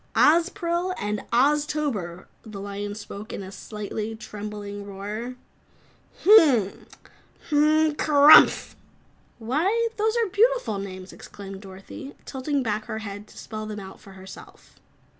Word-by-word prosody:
"Ozpril 345 Hz, +2 st, +2 dB
and 210 Hz, 0 st, -2 dB
Oztober!" 270 Hz, -, 0 dB, 0.2 s
The 215 Hz, -3 st, -9 dB
lion 205 Hz, +1 st, -5 dB
spoke 210 Hz, +1 st, -9 dB
in 200 Hz, -, -6 dB
a 190 Hz, -, -9 dB
slightly 210 Hz, +2 st, -6 dB
trembling 205 Hz, -2 st, -7 dB
roar. 205 Hz, +5 st, -6 dB, 0.9 s
"Mmmn! 285 Hz, -, +5 dB, 0.6 s
Mmmnnnnmn! 305 Hz, +1 st, +3 dB
Kerumph!" 295 Hz, 0 st, +6 dB, 0.6 s
"Why, 345 Hz, -, 0 dB
those 440 Hz, +2 st, +1 dB
are 465 Hz, -, +2 dB
beautiful 420 Hz, -, +2 dB
names," 185 Hz, -1 st, -8 dB
exclaimed 195 Hz, -1 st, -10 dB
Dorothy, 195 Hz, +9 st, -10 dB
tilting 275 Hz, +1 st, -2 dB
back 215 Hz, -1 st, -2 dB
her 220 Hz, -, -5 dB
head 205 Hz, -1 st, -7 dB
to -, -, -17 dB
spell 215 Hz, -1 st, -7 dB
them 210 Hz, -1 st, -6 dB
out 190 Hz, -1 st, -10 dB
for 195 Hz, -, -15 dB
herself. 190 Hz, 0 st, -14 dB
220 Hz, 120 wpm, -25 LUFS, 200-300 Hz, 0.9 s, Kerumph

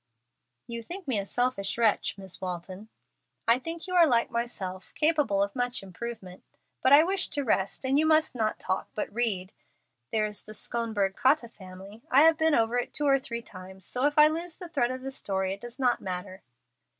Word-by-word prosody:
"You 235 Hz, 0 st, -4 dB
think 355 Hz, -, -7 dB
me 240 Hz, -6 st, +2 dB
a 200 Hz, -, -5 dB
selfish 245 Hz, -5 st, -1 dB
wretch, 225 Hz, -3 st, +1 dB
Miss 190 Hz, -2 st, -8 dB
Walton." 185 Hz, +3 st, -6 dB, 0.6 s
"I 230 Hz, +2 st, +5 dB
think 330 Hz, +4 st, -6 dB
you 365 Hz, -, -6 dB
are 345 Hz, -2 st, +6 dB
like 235 Hz, -4 st, +2 dB
myself, 195 Hz, -6 st, -4 dB
capable 295 Hz, -11 st, +2 dB
of 200 Hz, 0 st, -4 dB
much 245 Hz, -3 st, -1 dB
improvement. 190 Hz, -1 st, -8 dB, 0.4 s
But 260 Hz, -, +3 dB
I 290 Hz, +2 st, +9 dB
wish 380 Hz, +2 st, +4 dB
to 285 Hz, -, -2 dB
rest, 200 Hz, 0 st, 0 dB
and 270 Hz, +2 st, +3 dB
you 315 Hz, -, +3 dB
must 315 Hz, -1 st, +3 dB
not 220 Hz, -3 st, -1 dB
talk, 185 Hz, -, -2 dB
but 210 Hz, -, -4 dB
read. 205 Hz, -6 st, 0 dB, 0.6 s
There 215 Hz, -1 st, +1 dB
is 210 Hz, -1 st, -4 dB
the 215 Hz, -, -10 dB
'Schonberg 220 Hz, -5 st, -2 dB
Cotta 260 Hz, -2 st, +2 dB
Family.' 195 Hz, +1 st, -12 dB
I 275 Hz, +3 st, +6 dB
have 325 Hz, 0 st, +6 dB
been 320 Hz, -1 st, +3 dB
over 230 Hz, +2 st, +2 dB
it 245 Hz, -, -5 dB
two 295 Hz, -, 0 dB
or 275 Hz, -1 st, +4 dB
three 235 Hz, -2 st, -6 dB
times, 190 Hz, -1 st, -11 dB
so 255 Hz, +3 st, +1 dB
if 295 Hz, -, -3 dB
I 300 Hz, 0 st, +9 dB
lose 330 Hz, +2 st, -3 dB
the 355 Hz, -3 st, -9 dB
thread 255 Hz, -7 st, +1 dB
of 255 Hz, 0 st, -5 dB
the 270 Hz, -, -4 dB
story 190 Hz, -6 st, -2 dB
it 200 Hz, -, -10 dB
does 240 Hz, +1 st, -9 dB
not 250 Hz, -3 st, +1 dB
matter." 185 Hz, 0 st, -6 dB
235 Hz, 205 wpm, -28 LUFS, 195-280 Hz, 0.6 s, I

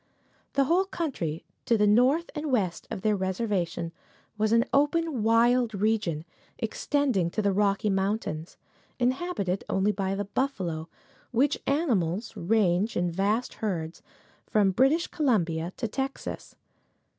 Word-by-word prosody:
The 275 Hz, -, +3 dB
whole 345 Hz, +7 st, +3 dB
country 230 Hz, -, -3 dB, 0.2 s
to 235 Hz, -, +4 dB
the 210 Hz, -, +3 dB
north 255 Hz, +11 st, +3 dB
and 300 Hz, -2 st, -3 dB
west 185 Hz, -9 st, 0 dB
of 215 Hz, -4 st, -5 dB
their 215 Hz, -1 st, +3 dB
reservation 190 Hz, -3 st, -2 dB, 0.4 s
was 215 Hz, 0 st, +1 dB
an 230 Hz, +1 st, +4 dB
open, 295 Hz, -1 st, +2 dB
wild 230 Hz, +1 st, +3 dB
region, 200 Hz, -6 st, 0 dB, 0.3 s
extending 225 Hz, -4 st, 0 dB
to 195 Hz, -, -4 dB
the 200 Hz, -1 st, +2 dB
Rocky 205 Hz, +1 st, +2 dB
Mountains, 190 Hz, -4 st, -2 dB, 0.4 s
inhabited 250 Hz, -, -1 dB
only 195 Hz, +2 st, +2 dB
by 195 Hz, -1 st, -2 dB
the 205 Hz, +1 st, -2 dB
buffalo, 185 Hz, -, -2 dB, 0.4 s
which 265 Hz, +4 st, +1 dB
animals 225 Hz, -, 0 dB
ranged 200 Hz, +1 st, +1 dB
in 175 Hz, 0 st, +1 dB
vast 205 Hz, +7 st, 0 dB
herds 170 Hz, -6 st, -3 dB, 0.5 s
from 205 Hz, -3 st, +3 dB
British 270 Hz, -, +3 dB
Columbia 175 Hz, -, 0 dB
to 235 Hz, -, -2 dB
Texas. 270 Hz, +5 st, -5 dB
215 Hz, 130 wpm, -27 LUFS, 185-255 Hz, 0.5 s, to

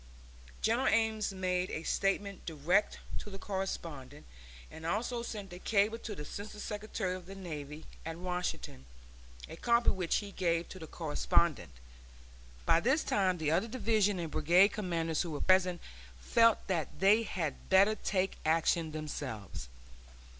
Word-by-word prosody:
General 235 Hz, +4 st, +2 dB
Ames 220 Hz, -2 st, +2 dB
made 185 Hz, -1 st, -1 dB
a 160 Hz, -, -4 dB
statement 195 Hz, +2 st, -1 dB
direct 170 Hz, +6 st, +1 dB, 0.2 s
to -, -, -8 dB
the 195 Hz, -, -7 dB
correspondent, 165 Hz, -8 st, -5 dB, 0.5 s
and 160 Hz, -, -10 dB
also 230 Hz, +8 st, -1 dB
sent 205 Hz, -5 st, -6 dB
a 180 Hz, -, -8 dB
cable 215 Hz, +3 st, +2 dB
to 215 Hz, -3 st, -6 dB
the 150 Hz, -, -6 dB
Assistant 210 Hz, +6 st, -7 dB
Secretary 210 Hz, -3 st, -3 dB
of 185 Hz, -1 st, -8 dB
the 195 Hz, -, -8 dB
Navy 155 Hz, -5 st, -7 dB, 0.2 s
at 165 Hz, 0 st, -5 dB
Washington, 180 Hz, -, -4 dB, 0.6 s
a -, -, -8 dB
copy 235 Hz, 0 st, +3 dB
of -, -, -4 dB
which 180 Hz, -3 st, 0 dB
he 205 Hz, -1 st, -2 dB
gave 170 Hz, -3 st, 0 dB
to 185 Hz, -, -9 dB
the 160 Hz, -, -8 dB
correspondent. 160 Hz, -, +1 dB, 1.0 s
By 165 Hz, -, +5 dB
this 265 Hz, -, +2 dB
time 190 Hz, -3 st, +1 dB
the 155 Hz, -2 st, 0 dB
other 180 Hz, +7 st, +2 dB
division 215 Hz, -4 st, +1 dB
and 165 Hz, -3 st, -4 dB
brigade 175 Hz, +6 st, +5 dB
commanders 165 Hz, -6 st, -1 dB
who 175 Hz, -, -3 dB
were 150 Hz, -2 st, -4 dB
present 185 Hz, -2 st, +3 dB, 0.4 s
felt 230 Hz, -, +4 dB
that 160 Hz, -5 st, -2 dB
they 205 Hz, +4 st, +6 dB
had 170 Hz, -9 st, -4 dB
better 195 Hz, +3 st, +6 dB
take 195 Hz, -3 st, -1 dB
action 160 Hz, 0 st, +2 dB
themselves. 120 Hz, -, -5 dB
185 Hz, 155 wpm, -32 LUFS, 165-210 Hz, 1.0 s, they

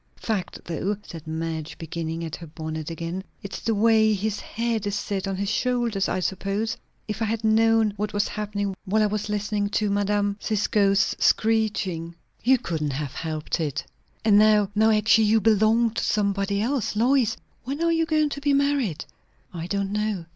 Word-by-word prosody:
"Fact, 210 Hz, -5 st, -3 dB
though," 185 Hz, +5 st, -2 dB
said 165 Hz, -2 st, -10 dB
Madge, 160 Hz, 0 st, -4 dB
beginning 165 Hz, 0 st, -4 dB
at 160 Hz, -, -5 dB
her 170 Hz, -, -10 dB
bonnet 155 Hz, 0 st, -5 dB
again. 170 Hz, +3 st, -4 dB, 0.2 s
"It's 200 Hz, -, -6 dB
the 225 Hz, -, 0 dB
way 220 Hz, 0 st, +4 dB
his 205 Hz, +1 st, -2 dB
head 230 Hz, -2 st, -2 dB
is 205 Hz, -, -1 dB
set 200 Hz, -1 st, -2 dB
on 195 Hz, -, -2 dB
his 200 Hz, +1 st, -2 dB
shoulders, 235 Hz, -4 st, 0 dB
I 185 Hz, -, -1 dB
suppose. 195 Hz, +4 st, -1 dB, 0.3 s
If 215 Hz, +1 st, -4 dB
I -, -, +2 dB
had 225 Hz, +1 st, -2 dB
known 220 Hz, -1 st, +4 dB
what 210 Hz, +1 st, -2 dB
was 205 Hz, 0 st, 0 dB
happening, 205 Hz, -2 st, -3 dB
while 215 Hz, +3 st, +2 dB
I -, -, +4 dB
was 210 Hz, 0 st, -2 dB
listening 205 Hz, 0 st, -1 dB
to 210 Hz, 0 st, 0 dB
Mme. 205 Hz, 0 st, +1 dB
Cisco's 205 Hz, -2 st, +2 dB
screeching!" 205 Hz, -7 st, +1 dB, 0.3 s
"You 260 Hz, +2 st, +5 dB
couldn't 155 Hz, -, -3 dB
have 140 Hz, 0 st, -4 dB
helped 155 Hz, 0 st, -3 dB
it." 150 Hz, -3 st, -2 dB, 0.4 s
"And 205 Hz, -2 st, +6 dB
now, 210 Hz, -2 st, +4 dB
now, 220 Hz, +1 st, +4 dB
actually 220 Hz, +1 st, +4 dB
you 220 Hz, +1 st, +4 dB
belong 220 Hz, +2 st, +3 dB
to 230 Hz, -, -3 dB
somebody 200 Hz, -1 st, 0 dB
else! 245 Hz, -3 st, -1 dB
Lois, 240 Hz, 0 st, +2 dB, 0.3 s
when 275 Hz, +3 st, -3 dB
are 335 Hz, -, +3 dB
you 325 Hz, -1 st, +1 dB
going 310 Hz, -2 st, +2 dB
to 285 Hz, -, -6 dB
be 285 Hz, 0 st, +2 dB
married?" 280 Hz, -, +1 dB, 0.5 s
"I 170 Hz, -1 st, -5 dB
don't 200 Hz, 0 st, -1 dB
know." 210 Hz, -4 st, -1 dB
205 Hz, 180 wpm, -25 LUFS, 185-220 Hz, 0.5 s, And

